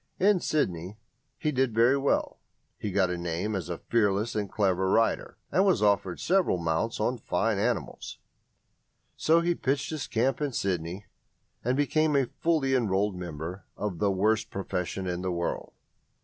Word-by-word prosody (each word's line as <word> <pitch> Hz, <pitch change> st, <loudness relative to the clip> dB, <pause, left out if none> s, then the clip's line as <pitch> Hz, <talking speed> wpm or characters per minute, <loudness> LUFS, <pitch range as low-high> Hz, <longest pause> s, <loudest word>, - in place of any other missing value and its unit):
In 200 Hz, 0 st, +4 dB
Sydney 95 Hz, -, -1 dB, 0.4 s
he 150 Hz, -, 0 dB
did 130 Hz, -4 st, +1 dB
very 120 Hz, +4 st, +5 dB
well; 140 Hz, 0 st, 0 dB, 0.4 s
he 105 Hz, -, -4 dB
got 95 Hz, -1 st, +2 dB
a 90 Hz, -, -3 dB
name 85 Hz, +5 st, -2 dB
as 90 Hz, -2 st, -4 dB
a 85 Hz, -, -3 dB
fearless 105 Hz, +1 st, +1 dB
and 105 Hz, -3 st, -2 dB
clever 95 Hz, -2 st, +1 dB
rider, 115 Hz, +3 st, +1 dB
and 190 Hz, -, +4 dB
was 190 Hz, -, +3 dB
offered 100 Hz, -3 st, +2 dB
several 180 Hz, -, +2 dB
mounts 85 Hz, +6 st, -1 dB
on 125 Hz, 0 st, 0 dB
fine 110 Hz, -3 st, 0 dB
animals. -, -, -2 dB, 1.0 s
So 165 Hz, +1 st, +3 dB
he 175 Hz, +1 st, +2 dB
pitched 140 Hz, -2 st, -1 dB
his 155 Hz, -4 st, -4 dB
camp 125 Hz, +4 st, 0 dB
in 145 Hz, -3 st, -1 dB
Sydney, 90 Hz, -1 st, -2 dB, 0.6 s
and 125 Hz, +3 st, +1 dB
became 150 Hz, +1 st, +2 dB
a 135 Hz, -2 st, +4 dB
fully 155 Hz, -5 st, +2 dB
enrolled 105 Hz, -5 st, +1 dB
member 85 Hz, +1 st, -6 dB
of 100 Hz, -5 st, -3 dB
the 100 Hz, -, +2 dB
worst 110 Hz, +3 st, +1 dB
profession 95 Hz, -1 st, -3 dB
in 90 Hz, -1 st, -2 dB
the 95 Hz, 0 st, -1 dB
world. 85 Hz, -1 st, -3 dB
105 Hz, 165 wpm, -28 LUFS, 90-135 Hz, 1.0 s, very